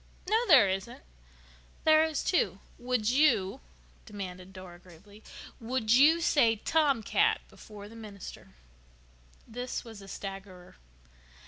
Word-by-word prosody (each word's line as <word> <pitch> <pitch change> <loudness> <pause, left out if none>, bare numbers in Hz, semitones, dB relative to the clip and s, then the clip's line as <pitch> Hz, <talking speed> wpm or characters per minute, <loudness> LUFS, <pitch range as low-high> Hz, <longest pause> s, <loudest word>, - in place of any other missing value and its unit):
"No, 445 +4 +1
there 265 - +7
isn't." 190 - -4 0.8
"There 315 0 +5
is, 315 -3 -2
too. 365 - 0 0.2
Would 245 -2 -1
you," 260 -6 +2 0.5
demanded 190 -3 -8
Dora 185 -2 -12
gravely, 190 +4 -17 0.4
"would 230 -1 -2
you 305 +6 +5
say 235 -8 +3
'tomcat' 310 - +1
before 205 -1 -12
the 225 - -14
minister?" 205 - -11 0.9
This 245 +2 -5
was 225 -3 -11
a 195 - -13
staggerer. 195 -2 -9
220 Hz, 115 wpm, -29 LUFS, 195-280 Hz, 0.9 s, there